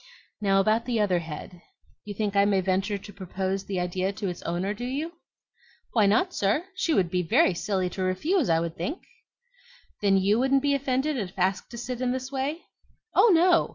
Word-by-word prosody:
Now, 195 -1 +3
about 215 +4 +2
the 235 -2 0
other 190 -4 +2
head; 165 +2 -8 0.4
you 205 -1 -6
think 205 -1 -2
I 200 - +5
may 200 -1 +3
venture 190 +2 0
to 205 +1 -12
propose 190 0 -3
the 190 -2 -2
idea 185 +2 -1
to 200 -1 -3
its 175 - -6
owner, 180 +4 -2
do 235 - -7
you?" 285 +7 -3 0.8
"Why 215 -4 +4
not, 355 - +2
sir? 205 - +1
She 375 -2 -1
would 180 -3 +2
be 180 - +1
very 180 +2 +3
silly 190 +1 -1
to 190 - -5
refuse, 260 - +1
I 165 0 +2
think." 175 - -5 1.0
"Then 195 -1 +4
YOU 200 +4 +2
wouldn't 270 +1 +2
be 285 -1 +2
offended 275 +1 0
if 195 -5 -5
asked 185 +1 0
to 235 - -9
sit 245 +1 -5
in 250 -1 +1
this 260 +1 -5
way?" 280 +5 -2 0.5
"Oh, 470 - +6
no. 345 0 +4
205 Hz, 195 wpm, -26 LUFS, 185-260 Hz, 1.0 s, Oh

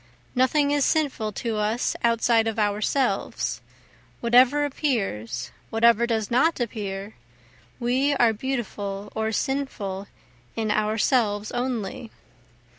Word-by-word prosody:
Nothing 285 +3 +2
is 290 -1 +2
sinful 275 -10 0
to 225 +1 -3
us 215 +3 0
outside 230 -1 +3
of 225 -1 -2
ourselves, 210 +2 0 0.6
Whatever 255 +5 +4
appears, 195 - -2 0.2
whatever 235 +1 +4
does 220 -2 -1
not 275 +7 +3
appear, 205 -3 -4 0.7
we 260 +4 +1
are 235 -4 +4
beautiful 210 -5 -4
or 220 0 -1
sinful 205 -7 -2 0.5
in 220 -2 -1
ourselves 215 0 +1
only. 240 -3 -3
230 Hz, 105 wpm, -25 LUFS, 210-255 Hz, 0.7 s, Whatever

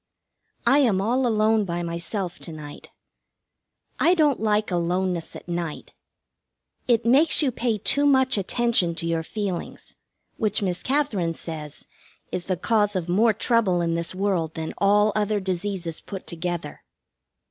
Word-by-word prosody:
I 280 - +5
am 225 -9 +3
all 245 +6 +1
alone 220 -1 +3
by 175 -2 -3
myself 170 +2 -4
to 170 - -7
night. 150 -2 -10 1.1
I 350 +2 +4
don't 300 -5 +3
like 210 -1 +1
aloneness 175 0 -1
at - - -10
night. 170 -3 -4 1.0
It 235 -2 +2
makes 285 +7 +4
you 270 - +2
pay 230 -2 -1
too 285 +8 +2
much 265 -2 +4
attention 200 -3 +1
to 165 - -5
your 165 -1 0
feelings, 190 0 -5 0.4
which 215 -2 0
Miss 180 -2 -1
Katherine 225 - 0
says 155 -3 -8 0.5
is 175 - -3
the 185 -2 -1
cause 210 +2 +1
of 175 -2 -2
more 220 +6 +4
trouble 215 -4 +2
in 170 -1 0
this 170 +1 -3
world 185 -5 -1
than 160 0 -4
all 205 +1 +4
other 210 0 +1
diseases 185 -3 -3
put 195 -2 -8
together. 170 -3 -4
195 Hz, 145 wpm, -24 LUFS, 170-225 Hz, 1.1 s, I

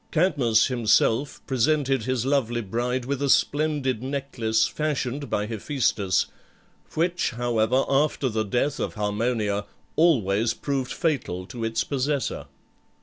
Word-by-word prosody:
Cadmus 140 -10 +3
himself 120 +2 +1
presented 135 -1 +1
his 130 -2 -1
lovely 125 -4 +1
bride 120 +4 -2
with 140 +1 -2
a 140 - +1
splendid 145 -5 +1
necklace 130 -5 0
fashioned 145 -3 -2
by 105 - 0
Hephæstus, 110 - 0 0.7
which, 170 +2 +1
however, 120 +1 +1
after 140 0 +1
the 110 -3 -1
death 125 +8 -1
of - - -3
Harmonia, 105 -1 -1 0.3
always 115 - +3
proved 135 -1 -2
fatal 125 - -1
to 115 +4 -7
its 115 0 0
possessor. 140 0 -2
125 Hz, 120 wpm, -25 LUFS, 110-140 Hz, 0.7 s, Cadmus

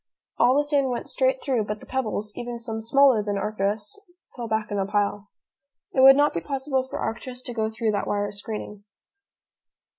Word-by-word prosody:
All 245 +2 +5
the 290 - +4
sand 285 -2 +1
went 245 - -3
straight - - +1
through, 255 - 0
but 210 0 -4
the - - -13
pebbles, 215 -5 -3
even 240 0 -5
some 225 -1 -5
smaller 260 0 +4
than 205 -1 -2
Arcturus, 210 - -2 0.4
fell 240 -2 -5
back 220 -1 -1
in 205 - -1
a 195 - +1
pile. 205 0 -1 0.6
It - - 0
would 270 +1 +10
not 290 +1 +3
be 170 - -2
possible 270 - -1
for 260 - -6
Arcturus 250 +2 -5
to 245 - -6
go 220 -1 0
through 220 0 -1
that 205 -1 -2
wire 205 0 -1
screening. 210 0 -7
225 Hz, 190 wpm, -25 LUFS, 210-265 Hz, 0.6 s, would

